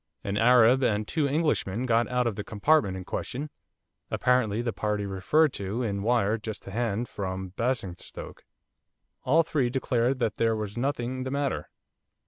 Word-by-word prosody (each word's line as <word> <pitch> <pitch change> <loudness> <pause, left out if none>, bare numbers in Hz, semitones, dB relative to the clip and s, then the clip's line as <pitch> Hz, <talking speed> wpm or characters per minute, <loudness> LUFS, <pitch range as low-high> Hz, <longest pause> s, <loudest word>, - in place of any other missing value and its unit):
An 100 - -2
Arab 120 +3 +5
and 105 -4 +1
two 150 -3 0
Englishmen 140 - 0
got 115 -1 +2
out 125 0 0
of 115 -4 -1
the 105 - -4
compartment 105 -2 +2
in 95 - -6
question, 145 +9 -4 0.6
apparently 125 -4 +2
the 115 -2 -2
party 105 -1 -1
referred 125 +11 +2
to 100 +5 -3
in 100 -3 -2
wire 110 -1 +2
just 110 0 -6
to 95 - -9
hand 115 +1 -1
from 95 -2 -4
Basingstoke. 110 -3 -4 0.8
All 160 +6 +4
three 140 -6 0
declared 125 0 0
that 115 -4 -1
there 115 -1 +2
was 105 -1 -4
nothing 130 0 -2
the 130 - -3
matter. 140 +1 -2
115 Hz, 160 wpm, -27 LUFS, 105-130 Hz, 0.8 s, Arab